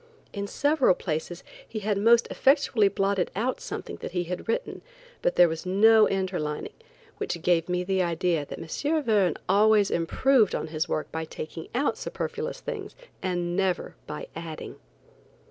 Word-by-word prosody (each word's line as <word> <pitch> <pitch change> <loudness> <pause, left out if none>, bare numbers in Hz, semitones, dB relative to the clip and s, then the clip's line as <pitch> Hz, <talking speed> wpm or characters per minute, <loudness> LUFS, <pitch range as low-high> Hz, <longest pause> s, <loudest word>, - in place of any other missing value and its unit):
In 200 -1 -3
several 285 - +3
places 170 +1 -4 0.3
he 225 - -6
had 205 0 0
most 230 +4 +5
effectually 265 -6 +3
blotted 195 -1 0
out 240 +6 -1
something - - -6
that - - -7
he 180 -1 0
had 180 +1 -5
written, - - -2 0.4
but - - +1
there 175 - +7
was 160 0 -4
no 215 +4 +5
interlining, 180 -6 -2 0.5
which 170 - -3
gave 175 -1 +2
me 180 0 0
the 190 0 0
idea 170 -2 0
that - - -8
M. 295 - -1
Verne 205 - +2
always 205 +1 +4
improved 220 +7 +3
his 160 +2 -2
work 155 - -2
by 160 0 -3
taking 160 +1 -7
out 275 +4 0
superfluous 470 +1 -4
things - - -6 0.3
and 175 -1 -1
never 190 -2 0
by 150 - -5
adding. 165 -1 -7
190 Hz, 155 wpm, -27 LUFS, 170-220 Hz, 0.5 s, there